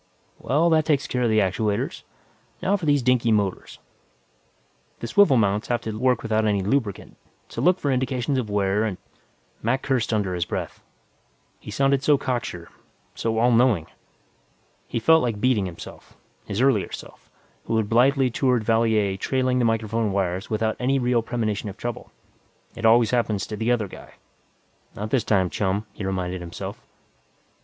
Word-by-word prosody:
"Well, 160 Hz, +5 st, +2 dB
that 155 Hz, -1 st, +3 dB
takes 145 Hz, -3 st, +1 dB
care 125 Hz, -, -2 dB
of 120 Hz, -, +2 dB
the 110 Hz, -, +2 dB
actuators. 105 Hz, +1 st, 0 dB, 0.6 s
Now 195 Hz, +2 st, +1 dB
for 180 Hz, -6 st, -3 dB
these 145 Hz, -3 st, +3 dB
dinky 120 Hz, -2 st, +2 dB
motors. 100 Hz, -3 st, -1 dB, 1.2 s
The -, -, -5 dB
swivel 135 Hz, -, +4 dB
mounts 105 Hz, -1 st, +1 dB
have 120 Hz, -1 st, 0 dB
to 110 Hz, -1 st, -5 dB
work 125 Hz, +1 st, +1 dB
without 110 Hz, -1 st, +1 dB
any 100 Hz, -3 st, +1 dB
lubricant, 105 Hz, -1 st, -2 dB, 0.3 s
so -, -, -5 dB
look 180 Hz, +1 st, +3 dB
for 140 Hz, -, 0 dB
indications 130 Hz, 0 st, 0 dB
of 115 Hz, -4 st, -4 dB
wear 100 Hz, +1 st, +1 dB
and 105 Hz, -5 st, -2 dB, 0.4 s
" -, -, -38 dB
Mac 130 Hz, +4 st, 0 dB
cursed 125 Hz, -4 st, 0 dB
under 100 Hz, -4 st, 0 dB
his 90 Hz, -1 st, -1 dB
breath. -, -, -5 dB, 0.8 s
He -, -, -11 dB
sounded 135 Hz, +5 st, +1 dB
so 145 Hz, 0 st, +4 dB
cocksure, 120 Hz, -11 st, -4 dB, 0.4 s
so 115 Hz, -1 st, -2 dB
all 120 Hz, +2 st, +3 dB
knowing. 115 Hz, -8 st, +3 dB, 1.0 s
He -, -, -3 dB
felt 160 Hz, +7 st, +5 dB
like 115 Hz, -4 st, -2 dB
beating 110 Hz, -5 st, +2 dB
himself. 85 Hz, -2 st, -11 dB, 0.3 s
His 100 Hz, +3 st, -2 dB
earlier 130 Hz, -7 st, +2 dB
self, -, -, -10 dB, 0.4 s
who 115 Hz, -, 0 dB
had 110 Hz, -2 st, 0 dB
blithely 130 Hz, +3 st, +3 dB
toured 125 Hz, -2 st, +1 dB
Valier 110 Hz, -3 st, +2 dB
trailing 130 Hz, +3 st, 0 dB
the 120 Hz, -, +2 dB
microphone 115 Hz, -1 st, 0 dB
wires 95 Hz, 0 st, -2 dB
without 110 Hz, 0 st, 0 dB
any 135 Hz, +2 st, +1 dB
real 125 Hz, -2 st, +1 dB
premonition 110 Hz, -3 st, -2 dB
of 100 Hz, -, -10 dB
trouble. 120 Hz, -1 st, -6 dB, 0.6 s
It 115 Hz, -1 st, 0 dB
always 115 Hz, 0 st, +5 dB
happens 115 Hz, -5 st, 0 dB
to 105 Hz, -, -6 dB
the 115 Hz, +3 st, 0 dB
other 115 Hz, -4 st, +1 dB
guy -, -, -13 dB, 0.8 s
Not 105 Hz, +2 st, -5 dB
this 130 Hz, -, +2 dB
time, 95 Hz, -4 st, +1 dB
chum, 100 Hz, +1 st, -1 dB
he -, -, -7 dB
reminded 90 Hz, -1 st, -3 dB
himself. 85 Hz, -1 st, -7 dB
115 Hz, 170 wpm, -24 LUFS, 105-125 Hz, 1.2 s, felt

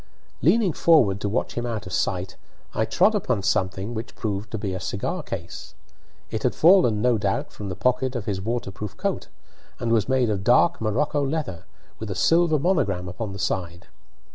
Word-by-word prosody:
Leaning 185 Hz, -, +3 dB
forward 110 Hz, -, +4 dB
to 100 Hz, -, -1 dB
watch 110 Hz, -, -1 dB
him 120 Hz, 0 st, -3 dB
out 110 Hz, -4 st, -4 dB
of 90 Hz, -, -8 dB
sight, 90 Hz, 0 st, -1 dB, 0.4 s
I 110 Hz, -, +1 dB
trod 205 Hz, -, +3 dB
upon 125 Hz, -, -1 dB
something 100 Hz, +1 st, -1 dB
which 110 Hz, 0 st, -6 dB
proved 105 Hz, -1 st, -3 dB
to 110 Hz, -, -4 dB
be 100 Hz, -3 st, -3 dB
a 95 Hz, -, -3 dB
cigar 90 Hz, -, -3 dB
case. -, -, -7 dB, 0.6 s
It 110 Hz, -, -2 dB
had 125 Hz, -, 0 dB
fallen, 160 Hz, -, +5 dB
no 125 Hz, -3 st, +3 dB
doubt, 135 Hz, +9 st, -1 dB
from 100 Hz, -2 st, -6 dB
the 90 Hz, -, -4 dB
pocket 125 Hz, +5 st, 0 dB
of 115 Hz, -4 st, -3 dB
his 100 Hz, -4 st, -2 dB
waterproof 105 Hz, -2 st, -4 dB
coat, -, -, -2 dB, 0.5 s
and 115 Hz, -, -1 dB
was 115 Hz, 0 st, +2 dB
made 130 Hz, -4 st, +2 dB
of 100 Hz, -2 st, -2 dB
dark 125 Hz, -, +4 dB
morocco 140 Hz, +7 st, 0 dB
leather, 140 Hz, -, -3 dB, 0.3 s
with 110 Hz, -, -6 dB
a 95 Hz, -, -3 dB
silver 165 Hz, -, +3 dB
monogram 135 Hz, -, 0 dB
upon 100 Hz, +4 st, -5 dB
the 100 Hz, -, -7 dB
side. 85 Hz, -2 st, -3 dB
110 Hz, 190 wpm, -24 LUFS, 100-130 Hz, 0.6 s, fallen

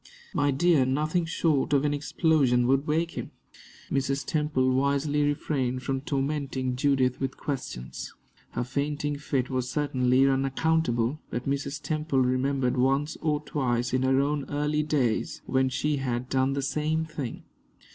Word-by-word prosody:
"My 145 Hz, -, +2 dB
dear, 145 Hz, +1 st, +4 dB
nothing 155 Hz, +6 st, 0 dB
short 155 Hz, -3 st, +1 dB
of 140 Hz, 0 st, +3 dB
an 145 Hz, -, +1 dB
explosion 145 Hz, -4 st, +2 dB
would 135 Hz, +3 st, +2 dB
wake 165 Hz, +2 st, +1 dB
him." -, -, -6 dB, 0.6 s
Mrs. 135 Hz, 0 st, 0 dB
Temple 150 Hz, -7 st, +1 dB
wisely 140 Hz, +2 st, +1 dB
refrained 135 Hz, -3 st, -1 dB
from 135 Hz, 0 st, -1 dB
tormenting 135 Hz, -2 st, -2 dB
Judith 130 Hz, -1 st, +2 dB
with 135 Hz, -1 st, -3 dB
questions. 130 Hz, -, -5 dB, 0.4 s
Her -, -, -1 dB
fainting 145 Hz, +2 st, -2 dB
fit 135 Hz, -4 st, -1 dB
was 130 Hz, -1 st, -1 dB
certainly 130 Hz, -3 st, +2 dB
unaccountable, 135 Hz, -1 st, +1 dB
but 120 Hz, +2 st, -4 dB
Mrs. 140 Hz, +1 st, -2 dB
Temple 155 Hz, -2 st, -2 dB
remembered 130 Hz, 0 st, +1 dB
once 135 Hz, +4 st, +1 dB
or 150 Hz, -2 st, 0 dB
twice 125 Hz, -5 st, -1 dB
in 130 Hz, -, +2 dB
her 130 Hz, 0 st, +3 dB
own 145 Hz, 0 st, -1 dB
early 150 Hz, +1 st, 0 dB
days 140 Hz, -7 st, 0 dB
when 130 Hz, 0 st, +2 dB
she 145 Hz, +3 st, 0 dB
had 125 Hz, -2 st, -2 dB
done 135 Hz, 0 st, +2 dB
the 140 Hz, 0 st, -2 dB
same 155 Hz, +3 st, 0 dB
thing. 145 Hz, -6 st, -6 dB
140 Hz, 145 wpm, -27 LUFS, 130-150 Hz, 0.6 s, dear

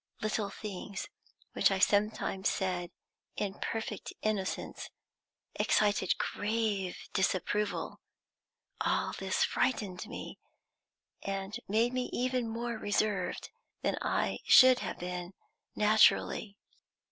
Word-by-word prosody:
Little 215 Hz, -1 st, -1 dB
things 200 Hz, -1 st, -6 dB, 0.5 s
which -, -, +4 dB
I 195 Hz, -, +1 dB
sometimes 205 Hz, 0 st, +2 dB
said, 180 Hz, -2 st, -1 dB, 0.5 s
in 200 Hz, -1 st, -3 dB
perfect 220 Hz, -2 st, -4 dB
innocence, 205 Hz, -3 st, -2 dB, 0.6 s
excited 205 Hz, -3 st, +2 dB
grave 205 Hz, -3 st, -1 dB, 0.2 s
disapproval. 200 Hz, +2 st, 0 dB, 0.8 s
All -, -, +1 dB
this -, -, 0 dB
frightened 205 Hz, -6 st, 0 dB
me, 250 Hz, -, -7 dB, 0.8 s
and 195 Hz, +1 st, -3 dB
made 230 Hz, +4 st, +2 dB
me 255 Hz, -1 st, -1 dB
even 250 Hz, -1 st, 0 dB
more 235 Hz, 0 st, -3 dB
reserved 205 Hz, 0 st, -1 dB, 0.3 s
than -, -, +1 dB
I -, -, 0 dB
should 255 Hz, -1 st, +8 dB
have -, -, -4 dB
been 180 Hz, +1 st, -5 dB, 0.4 s
naturally. 210 Hz, -1 st, +4 dB
210 Hz, 100 wpm, -31 LUFS, 195-220 Hz, 0.8 s, should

